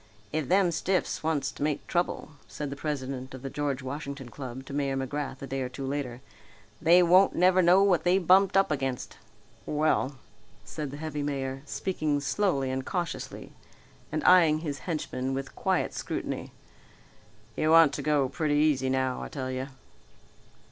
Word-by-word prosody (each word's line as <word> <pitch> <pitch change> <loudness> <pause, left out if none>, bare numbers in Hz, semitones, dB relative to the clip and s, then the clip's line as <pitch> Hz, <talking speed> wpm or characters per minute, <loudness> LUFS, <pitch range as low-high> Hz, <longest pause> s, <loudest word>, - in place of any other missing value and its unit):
"If 155 -3 -1
them 185 -1 +4
stiffs 185 +3 -1
wants 155 -3 0
to - - -13
make 150 -1 -1
trouble," 175 -3 -1 0.2
said 145 -2 -5
the - - -4
president 135 -3 -4
of 130 - -11
the 135 - -5
George 140 -2 -2
Washington 140 -1 -6
Club 130 +1 -8
to 140 - -9
Mayor 140 -1 -1
McGrath 135 +1 -4
a - - -3
day 135 0 -3
or 125 - -2
two 135 +2 -6
later, 130 -3 -4 0.6
"they 170 +3 +6
won't 185 +3 +5
never 185 +1 +4
know 180 +3 +6
what 180 -5 +3
they've 180 +1 +2
bumped 190 +2 +5
up 195 -4 +3
against." 135 -3 -3 0.5
"Well," 150 -3 +1 0.5
said 150 -2 -5
the 140 - -7
heavy 150 -1 -4
mayor, 135 -2 -3
speaking 155 -6 -1
slowly 140 -4 0
and 130 0 -2
cautiously 175 +1 -4 0.6
and 155 0 -2
eyeing 165 -4 +6
his 145 -4 -4
henchman 135 -5 -2
with 135 0 -5
quiet - - 0
scrutiny, - - -4 1.0
"you 155 - +1
want 160 -3 +7
to - - -3
go 145 -3 +2
pretty 150 +1 -1
easy 145 -3 +2
now, 130 -1 0
I - - -5
tell 130 -2 -4
you." 130 +1 -3
145 Hz, 170 wpm, -28 LUFS, 135-165 Hz, 1.0 s, want